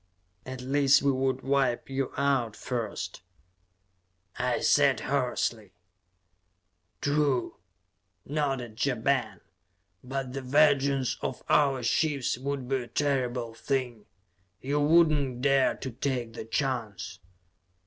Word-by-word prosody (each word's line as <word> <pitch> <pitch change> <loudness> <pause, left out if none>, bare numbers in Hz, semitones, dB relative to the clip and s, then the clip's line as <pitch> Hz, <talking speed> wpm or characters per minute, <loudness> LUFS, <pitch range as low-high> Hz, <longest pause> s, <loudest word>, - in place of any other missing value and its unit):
"At 130 0 -6
least, 140 +2 +3
we 140 - +4
would 130 0 -1
wipe 135 -3 +1
you 135 -1 -2
out 135 -5 +1
first," 110 -7 -4 1.2
I - - +1
said - - +4
hoarsely. 120 -6 -1 1.3
"True," 145 -3 0 0.7
nodded 135 -6 -2
Ja 135 -3 +1
Ben. 110 -5 -1 0.6
"But 130 0 -4
the 135 - -4
vengeance 140 -1 +3
of - - -4
our 135 -4 +3
ships 140 +2 +1
would 135 -1 -3
be 135 +1 +1
a 125 -2 -6
terrible 125 -3 -1
thing! 125 -3 -3 0.5
You 140 +3 -1
would 160 +2 +5
not 135 -5 -1
dare 135 -1 +3
to 130 - -6
take 120 -2 -3
the 110 - -7
chance!" 115 -5 -3
135 Hz, 115 wpm, -28 LUFS, 120-140 Hz, 1.3 s, would